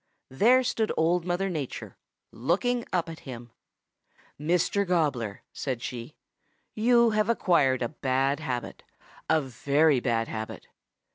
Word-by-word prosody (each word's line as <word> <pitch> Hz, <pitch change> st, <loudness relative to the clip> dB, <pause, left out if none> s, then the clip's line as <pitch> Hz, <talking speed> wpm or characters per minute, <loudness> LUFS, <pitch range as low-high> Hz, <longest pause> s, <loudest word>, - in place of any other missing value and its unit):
There 240 Hz, -, +4 dB
stood 225 Hz, -3 st, 0 dB
Old 165 Hz, +2 st, +2 dB
Mother 180 Hz, +2 st, 0 dB
Nature, 155 Hz, -8 st, -5 dB, 0.4 s
looking 200 Hz, -, 0 dB
up 175 Hz, -2 st, 0 dB
at 165 Hz, -1 st, -8 dB
him. 120 Hz, -3 st, -9 dB, 0.9 s
"'Mr. 175 Hz, +6 st, +1 dB
Gobbler,' 140 Hz, -, 0 dB
said 125 Hz, -4 st, -4 dB
she, 120 Hz, +3 st, -6 dB, 0.6 s
'you 235 Hz, +1 st, +4 dB
have 215 Hz, +1 st, +1 dB
acquired 145 Hz, -, +3 dB
a 120 Hz, -, -1 dB
bad 135 Hz, -1 st, 0 dB
habit, 125 Hz, -2 st, -4 dB, 0.5 s
a 160 Hz, -, +4 dB
very 140 Hz, +2 st, +2 dB
bad 115 Hz, -2 st, 0 dB
habit. 110 Hz, -1 st, -6 dB
155 Hz, 125 wpm, -27 LUFS, 130-185 Hz, 0.9 s, There